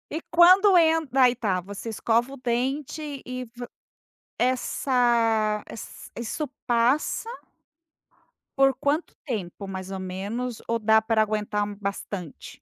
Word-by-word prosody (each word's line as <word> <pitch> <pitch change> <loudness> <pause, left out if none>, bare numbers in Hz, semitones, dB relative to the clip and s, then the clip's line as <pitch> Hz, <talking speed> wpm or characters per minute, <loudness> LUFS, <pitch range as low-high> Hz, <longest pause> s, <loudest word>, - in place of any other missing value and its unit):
E 325 - -3
quando 370 +4 +7
en 325 -1 +4
daí 255 -1 +5
tá, 200 -7 0
você 200 +5 -7
escova 235 +4 0
o 275 - -9
dente 270 +4 -2
e 255 0 -5
v 240 +1 -9 0.7
essa 235 -4 +1
ess 225 - -10
isso 235 +6 -3 0.2
passa 245 - +1 1.3
por 270 0 +5
quanto 300 +4 0 0.2
tempo 195 -1 -5
mais 190 0 -6
ou 190 - -4
menos, 205 +6 -4
ou 230 0 0
dá 220 0 +5
pra 220 0 +1
aguentar 210 -1 0
um 205 0 -5
bastante? 200 -4 -6
235 Hz, 130 wpm, -25 LUFS, 210-270 Hz, 1.3 s, quando